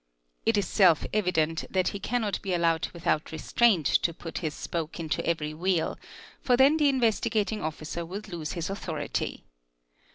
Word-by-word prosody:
«It 225 -1 +4
is 200 -3 +1
self 180 -6 +4
evident 165 -6 +1
that 185 -1 +1
he 200 - -6
cannot 220 -2 -1
be 190 -3 -1
allowed 165 -1 +1
without 170 -3 -1
restraint 185 +1 +2
to 170 +4 +2
put 165 - -6
his 155 -3 -3
spoke 165 0 -4
into 160 -2 -2
every 155 -2 -1
wheel, 175 +1 0 0.5
for 250 -2 +3
then 275 +4 +6
the 295 -2 +4
Investigating 225 -4 +1
Officer 155 +2 -4
would 195 +6 -7
lose 170 -5 -5
his 170 +2 -3
authority. 170 -5 -3
175 Hz, 160 wpm, -28 LUFS, 160-210 Hz, 0.5 s, then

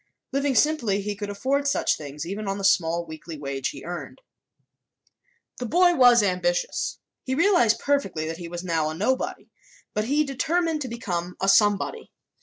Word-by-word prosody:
Living 275 0 0
simply, 240 -7 +2
he 205 +1 -3
could 205 0 -5
afford 270 +8 0
such 280 - +2
things, 150 +1 -7
even 200 +4 -5
on 195 0 -1
the 200 - -6
small 170 -3 +2
weekly 160 0 -9
wage 140 -2 -3
he 140 - -9
earned. 175 0 -7 1.4
The 245 - -3
boy 350 +8 +4
was 245 -6 +6
ambitious. 180 -2 -1 0.3
He 260 - -2
realized 305 - +4
perfectly 230 - -1
that 165 +1 -4
he 175 -1 -7
was 175 +1 -6
now 165 -3 0
a 155 - -5
nobody, 255 +9 -2 0.4
but 210 - -1
he 290 +5 +2
determined 315 +4 -1
to 265 - -3
become 180 -7 -4
a 195 - -1
somebody. 205 - +2
205 Hz, 170 wpm, -25 LUFS, 170-275 Hz, 1.4 s, was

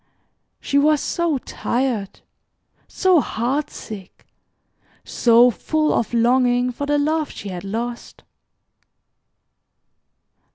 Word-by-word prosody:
She 280 - +1
was 300 +1 +3
so 340 -2 -1
tired, 240 -5 -3 0.7
so 370 -3 +3
heart 270 +7 -2
sick, 195 -4 -10 0.8
so 240 +1 +4
full 310 +6 0
of 230 - -1
longing 245 +1 +2
for 285 +4 -5
the 290 0 +2
love 305 +1 0
she 200 - -8
had 180 -1 -6
lost. 235 +4 -6
250 Hz, 95 wpm, -21 LUFS, 230-295 Hz, 0.8 s, so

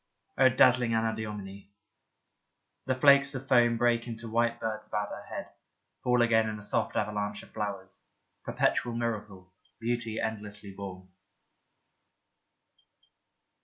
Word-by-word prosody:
O 130 0 +6
dazzling 125 -2 +4
Anadyomene! 105 -3 -3 1.2
The 130 - +1
flakes 140 +1 +5
of 130 +1 -6
foam 120 -3 +4
break 120 0 +2
into 115 -1 -6
white 115 +1 +1
birds 110 -1 -4
about 105 -1 -2
her - - -8
head, - - -6 0.5
fall 125 -1 +3
again 110 -1 +3
in 105 - -5
a 105 - -11
soft - - -1
avalanche 105 0 -2
of - - -17
flowers. 100 -3 -6 0.4
Perpetual 120 -1 0
miracle, 105 -5 -4 0.3
beauty 115 -1 -2
endlessly 105 -2 -5
born. 95 -2 -8
110 Hz, 120 wpm, -29 LUFS, 105-120 Hz, 1.2 s, O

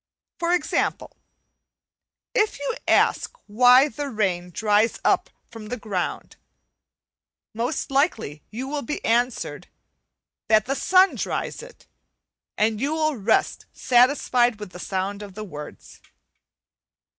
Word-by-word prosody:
For 340 -1 0
example, 360 - -2 1.2
if 435 -4 +1
you 285 +10 -3
ask - - +2
why 250 +5 +6
the 290 +2 -5
rain 190 -6 -1
dries 210 +4 +1
up - - +2 0.2
from 225 -2 -10
the 250 +3 -4
ground, 200 -5 -4 1.2
most 240 +6 -3
likely 250 - 0
you 250 +5 -6
will 290 +1 -3
be 290 +4 -5
answered, 240 +2 -1 0.8
"that 215 -1 +4
the 270 - -1
sun 375 +5 +4
dries - - -3
it," - - -14 0.7
and 215 +1 +1
you 285 +3 0
will 310 -2 0
rest 220 -1 0
satisfied 245 -2 +3
with 210 -3 -8
the 180 - -10
sound 195 +2 -3
of 200 -2 -10
the 215 - -6
words. 150 -7 -10
235 Hz, 120 wpm, -23 LUFS, 210-280 Hz, 1.2 s, why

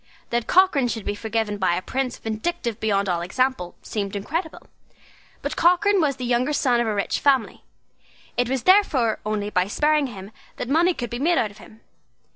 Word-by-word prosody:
That 235 -1 -1
Cochrane 350 -9 +4
should 225 -3 -4
be - - -1
forgiven 220 -1 -2
by 185 -2 +2
a 180 - -2
prince 260 +2 -2
vindictive 225 +1 -3
beyond 200 -2 0
all 175 -2 0
example, 190 0 -1
seemed 200 -2 -4
incredible. 315 - -4 0.8
But - - -3
Cochrane 375 +3 +3
was 285 -3 +1
the 250 - -5
younger 250 +4 +1
son 250 -4 +2
of 240 - 0
a 215 - -1
rich 200 - -1
family; 270 -5 +1 0.7
it 245 0 0
was 265 -2 -1
therefore 305 - +3
only 210 -1 -2
by 185 -2 +1
sparing 300 +6 +2
him 200 -4 -10 0.3
that - - -4
money 340 +5 +3
could 240 -2 -5
be 240 - -4
made 330 +4 +2
out 215 - 0
of 205 - -17
him. 220 - -16
240 Hz, 190 wpm, -23 LUFS, 210-295 Hz, 0.8 s, Cochrane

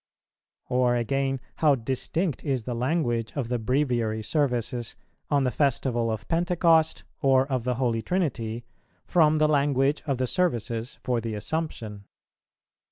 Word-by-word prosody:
Or 125 -1 +2
again, 135 +3 0 0.2
how 150 -3 +4
distinct 135 +7 -2
is 135 -6 -1
the 125 - -3
language 120 -3 -1
of 130 -5 -2
the 125 -1 0
Breviary 120 -3 0
Services 120 -2 -1 0.3
on 145 -2 +3
the 125 - +1
Festival 125 -4 +1
of 110 -1 -4
Pentecost, 165 -2 +2 0.2
or 135 -2 +4
of 130 -4 -2
the 125 -1 0
Holy 120 -3 0
Trinity, 120 -10 -2 0.4
from 155 -3 +4
the 155 0 +4
language 140 -1 +2
of 135 -3 0
the 130 - 0
Services 120 - -1
for 120 -2 0
the 110 -1 -4
Assumption! 110 -5 -4
130 Hz, 140 wpm, -26 LUFS, 115-150 Hz, 0.4 s, how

